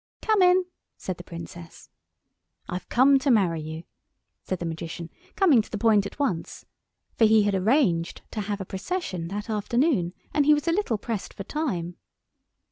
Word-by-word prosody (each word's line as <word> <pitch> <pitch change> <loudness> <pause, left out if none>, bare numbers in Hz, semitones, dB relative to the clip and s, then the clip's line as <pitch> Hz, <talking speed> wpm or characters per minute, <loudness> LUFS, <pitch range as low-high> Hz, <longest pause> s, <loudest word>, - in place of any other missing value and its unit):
"Come 435 -3 +3
in," 365 0 +5 0.3
said 185 -2 -5
the 175 - -9
Princess. 170 0 -10 0.8
"I've 180 +1 -6
come 270 +2 +5
to 275 - 0
marry 185 -9 +3
you," 160 +1 -7 0.6
said 185 - -3
the 175 - -5
Magician, 165 +1 -6 0.2
coming 320 - +5
to - - -14
the 215 - -4
point 210 -2 +3
at - - -13
once; 215 - -2 0.5
for 225 - +7
he 215 -1 +5
had 205 0 +1
arranged 190 - +1
to 215 - -3
have 205 0 -3
a 195 - -5
procession 190 - -4
that 205 +3 -5
afternoon, 220 - +1 0.2
and 290 -1 +2
he 300 - +7
was 295 +2 -4
a - - +4
little 350 - 0
pressed 220 -1 -5
for 195 - -6
time. 185 - -3
210 Hz, 175 wpm, -26 LUFS, 175-275 Hz, 0.8 s, for